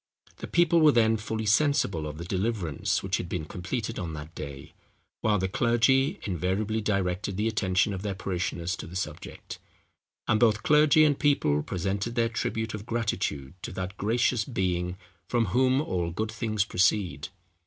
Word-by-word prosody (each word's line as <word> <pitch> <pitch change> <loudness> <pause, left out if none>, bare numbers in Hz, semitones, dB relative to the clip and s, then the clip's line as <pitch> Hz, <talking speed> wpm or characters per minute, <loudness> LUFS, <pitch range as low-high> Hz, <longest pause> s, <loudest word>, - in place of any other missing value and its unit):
The - - -7
people 170 -1 +3
were 155 -1 +7
then 115 -3 +4
fully 110 0 -3
sensible 105 - +2
of 75 0 -7
the 85 - -6
deliverance, 95 -5 -1
which 95 0 0
had 85 - -5
been 90 -4 -3
completed 105 +8 -4
on 85 -3 -4
that 75 +2 -8
day; 70 -3 -8 0.5
while 105 -1 +2
the 95 0 0
clergy 120 +6 +2
invariably 100 +4 -1
directed 100 -1 -1
the 105 +2 +1
attention 100 -2 +1
of 95 - -4
their 100 -1 -3
parishioners 90 -2 -2
to - - -7
the 85 - -10
subject; 95 - -6 0.7
and 110 - +3
both 110 -3 +3
clergy 150 +1 +5
and 145 -2 +2
people 105 - +2
presented 100 +8 -3
their 115 -2 +2
tribute 110 -1 -2
of 105 +1 -7
gratitude 95 - -2
to - - -6
that 95 +1 -5
gracious 115 +2 +1
Being 90 -5 -2 0.3
from 120 +1 +1
whom 130 +1 +3
all 90 - -2
good 110 +6 -3
things 110 -3 -1
proceed. 90 -6 +1
105 Hz, 165 wpm, -27 LUFS, 90-115 Hz, 0.7 s, were